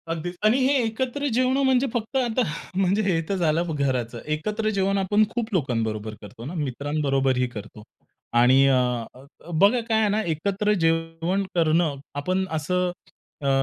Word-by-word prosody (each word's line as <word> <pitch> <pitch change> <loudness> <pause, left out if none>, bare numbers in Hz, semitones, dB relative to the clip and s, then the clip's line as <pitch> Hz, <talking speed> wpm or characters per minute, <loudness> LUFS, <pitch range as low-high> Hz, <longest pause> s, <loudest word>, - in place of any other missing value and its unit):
अगदीच 165 +2 -3
आणि 220 +4 +5
हे 275 - +3
एकत्र 260 +5 -2
जेवणं 255 +3 +2
म्हणजे 265 0 +3
फक्त 230 +2 -3
आता 250 -1 +1 0.3
म्हणजे 195 +2 +2
हे 185 -6 +1
तर 200 - +1
झालं 165 -2 +1
घराचं. 125 -4 -1
एकत्र 210 +9 -1
जेवण 195 +1 +1
आपण 205 +2 +3
खूप 235 -2 -3
लोकांबरोबर 110 - -1
करतो 105 +3 -11
ना, 150 - -6
मित्रांबरोबरही 135 -3 0
करतो. 105 -2 -10 0.6
आणि 130 +3 +6
अ, 135 - +4 0.4
अ, 130 +2 -15 0.3
बघा 200 +9 +4
काय 220 -1 +3
आहे 215 -1 +2
ना, 210 +2 +1
एकत्र 200 +6 0
जेवण 165 +3 0
करणं. 165 -2 +2 0.2
आपण 185 +7 0
असं 180 +4 0 0.5
अ, 140 - +1
175 Hz, 155 wpm, -24 LUFS, 140-215 Hz, 0.6 s, आणि